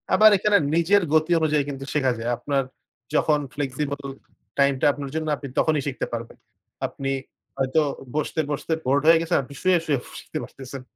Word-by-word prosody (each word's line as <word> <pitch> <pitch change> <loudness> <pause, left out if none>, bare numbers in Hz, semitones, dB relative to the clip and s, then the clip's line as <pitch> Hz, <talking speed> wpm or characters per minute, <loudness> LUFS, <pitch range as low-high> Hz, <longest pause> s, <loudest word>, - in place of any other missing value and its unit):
আবার 215 0 +8
এখানে 205 +2 +4 0.2
নিজের 180 +5 +4
গতি 155 +2 +3
অনুযায়ী 155 -2 +2
কিন্তু 135 -1 -6
শেখা 135 -4 +2
যায়। 115 +1 -2
আপনার 135 +3 0 0.5
যখন 150 -1 +3
ফ্লেক্সিবল 140 0 -3 0.6
টাইমটা 140 -1 +3
আপনার 140 -1 -6
জন্য 160 0 -2
আপনি 140 - -7
তখনই 155 -2 +2
শিখতে 135 - -2
পারবেন। 115 0 -5 0.5
আপনি 135 0 -4 0.5
হয়তো 135 +4 +2 0.3
বসতে, 155 +1 -1
বসতে 145 +3 -2
বোরেড 140 +3 +2
হয়ে 165 0 +8
গেছেন 165 +1 +1
আপনি 140 - -12
শুয়ে, 185 -1 +4
শুয়ে 145 -3 +2
ফু - - -13
শিখতে - - -6
পারতেছেন। 135 0 -9
145 Hz, 170 wpm, -24 LUFS, 135-160 Hz, 0.6 s, আবার